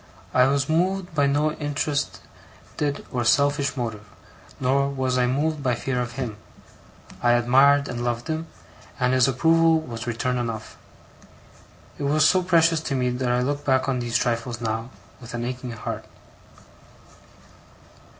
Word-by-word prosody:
I 125 0 +5
was 140 0 +1
moved 180 +2 0
by 145 -3 +2
no 145 +2 +2
interested 145 -1 -4
or 125 -2 -1
selfish 140 +3 +2
motive, 110 -4 -4 0.6
nor 140 +2 +2
was 130 -2 -1
I 125 -1 +2
moved 150 +4 0
by 125 -3 +1
fear 125 +1 -2
of 120 0 -4
him. 120 -5 -4 0.8
I 120 0 +4
admired 135 +4 +4
and 120 -1 -4
loved 120 -1 -2
him, 160 +1 -3 0.5
and 125 0 +2
his 130 -1 +4
approval 165 +4 +3
was 120 -6 -7
return 125 +2 -1
enough. 115 -3 -5 1.2
It - - -4
was 150 +1 +4
so 185 - +4
precious 165 -2 +3
to 155 -3 -3
me 125 -1 +1
that 125 0 -2
I 125 0 +2
look 145 +2 -2
back 130 -1 +2
on 130 -2 0
these 120 -1 0
trifles, 115 0 -2
now, 115 +1 -3 0.3
with 120 -1 -8
an 120 0 -3
aching 125 0 -5
heart. 110 - -5
130 Hz, 150 wpm, -24 LUFS, 120-145 Hz, 1.2 s, I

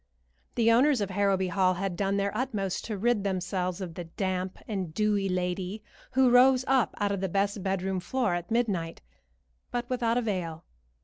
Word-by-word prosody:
The 230 -1 +4
owners 260 +3 +4
of 200 -2 -2
Harrowby 195 -1 +1
Hall 185 0 +2
had 190 0 -2
done 195 +2 0
their 200 +1 -1
utmost 210 -6 -2
to 215 -3 -3
rid 230 0 +1
themselves 185 -1 -2
of 175 -3 -5
the 175 +1 -6
damp 185 +2 -3
and 190 -6 -3
dewy 205 -2 +1
lady 180 +3 -2 0.3
who 260 -1 +4
rose 255 +1 +6
up 265 -3 +2
out 205 -1 0
of 200 -2 -2
the 190 - -1
best 200 +2 0
bedroom 190 0 -1
floor 225 +2 0
at 175 0 -3
midnight, 200 -9 -1 0.7
but 240 0 -3
without 240 -2 +1
avail. 180 -9 -2
195 Hz, 175 wpm, -28 LUFS, 185-230 Hz, 0.7 s, rose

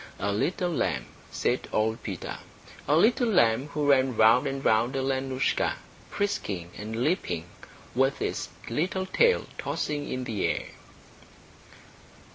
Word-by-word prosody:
A 100 +1 -1
little 175 - 0
lamb, 65 - -1 0.2
said - - -1
old 110 +1 0
Peter, - - -5 0.5
a 145 - +4
little 235 - +4
lamb 120 - +3
who 150 0 -2
ran 130 -4 +3
round 115 +5 +5
and 135 0 -4
round 115 +4 +3
Alenoushka, 135 0 0 0.3
frisking 100 - -2
and 110 +3 -4
leaping, 90 - -1 0.5
with 135 +2 +2
its - - -2 0.2
little 180 +9 -1
tail 470 - +3
tossing 145 -1 -2
in 130 0 -3
the 110 -5 -1
air. - - -1
130 Hz, 125 wpm, -27 LUFS, 110-150 Hz, 0.5 s, round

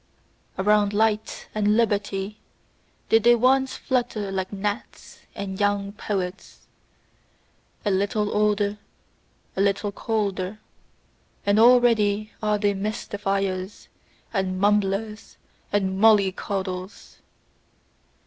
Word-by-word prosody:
Around 210 +1 +3
light 215 0 0
and 210 0 +2
liberty 205 -2 -1 0.7
did 225 - +5
they 240 0 +6
once 265 +3 +2
flutter 235 -6 -2
like 190 -1 -3
gnats 205 +3 -5 0.2
and 190 -1 -5
young 205 -1 0
poets. 195 -3 -5 1.2
A 205 - +2
little 205 +2 0
older, 210 0 +1 0.8
a 190 - 0
little 200 +1 +1
colder: 200 -2 -2 0.9
and 200 +1 +3
already 220 -3 +4
are 210 -1 +1
they 205 -1 +1
mystifiers, 195 -1 -3 0.4
and 190 -2 -1
mumblers 210 +1 0 0.3
and 190 -2 0
mollycoddles. 195 -3 +1
205 Hz, 90 wpm, -24 LUFS, 195-215 Hz, 1.2 s, they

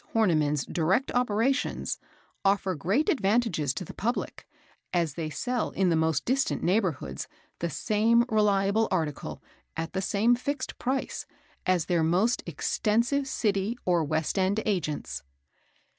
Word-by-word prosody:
Horniman's 155 -9 +2
direct 180 +10 +1
operations, 245 +2 0 0.4
offer 195 -1 +2
great 195 - 0
advantages 210 - +2
to 185 - -4
the - - -9
public, 240 +4 -3 0.4
as 170 -5 +1
they 155 +1 -3
sell 245 +8 -1
in 190 -2 +1
the 165 - +3
most 160 -3 +1
distant 270 +3 0
neighbourhoods 170 - 0 0.3
the 170 - -1
same 225 +5 +2
reliable 210 -1 +2
article, 160 -7 -2 0.3
at 165 +1 -3
the 190 - -1
same 210 +5 +3
fixed 270 +2 -4
price, 260 +2 -2 0.4
as 180 -3 +2
their 175 -2 +1
most 185 +9 +2
extensive 235 - +1
City 210 -2 0
or 175 -2 +3
West 155 +5 -1
end 190 +3 +2
Agents. 175 -8 -2
195 Hz, 130 wpm, -28 LUFS, 165-230 Hz, 0.4 s, the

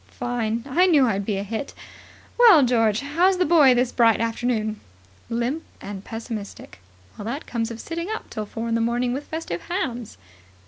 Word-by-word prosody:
"Fine. 235 -2 -2
I 345 +8 +3
knew 300 -7 +5
I'd 200 -4 -1
be 205 -3 0
a 195 - -2
hit. 225 +7 -5 0.6
Well, 440 - +7
George, 225 -3 +2
how's 345 +7 +2
the 365 - +2
boy 295 -6 +6
this 245 0 +1
bright 230 -2 +4
afternoon?" 225 -2 -1 0.5
"Limp 240 +7 -1 0.2
and 200 -1 -8
pessimistic." 220 - -7 0.4
"That 235 +9 -5
comes 230 -1 -2
of 230 -1 -7
sitting 335 - -5
up 440 - -5
till 215 -2 -5
four 225 +2 -5
in 230 - -1
the 230 - +1
morning 240 +2 0
with 280 +3 -5
festive 315 - -4
hams." 255 - -3
240 Hz, 175 wpm, -23 LUFS, 225-290 Hz, 0.6 s, Well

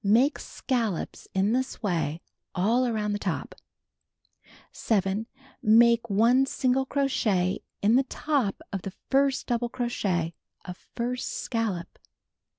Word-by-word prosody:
Make 235 +9 +3
scallops 230 - -3
in 195 +3 +2
this 260 -1 -2
way 170 -4 -1 0.3
all 230 +8 +2
around 215 -3 -1
the 205 - -2
top. - - -3 1.2
7. 205 0 0 0.3
Make 235 +1 +5
1 235 +6 +4
single 265 0 +1
crochet 210 -10 +1 0.2
in 220 +4 +5
the - - +5
top 275 -10 -1
of 195 - -2
the 195 - -6 0.2
first 275 0 +2
double 240 0 -1
crochet 200 -9 -1 0.3
of 180 -1 -7 0.2
first 245 +1 -2
scallop. 215 -7 -3
225 Hz, 120 wpm, -27 LUFS, 195-250 Hz, 1.2 s, Make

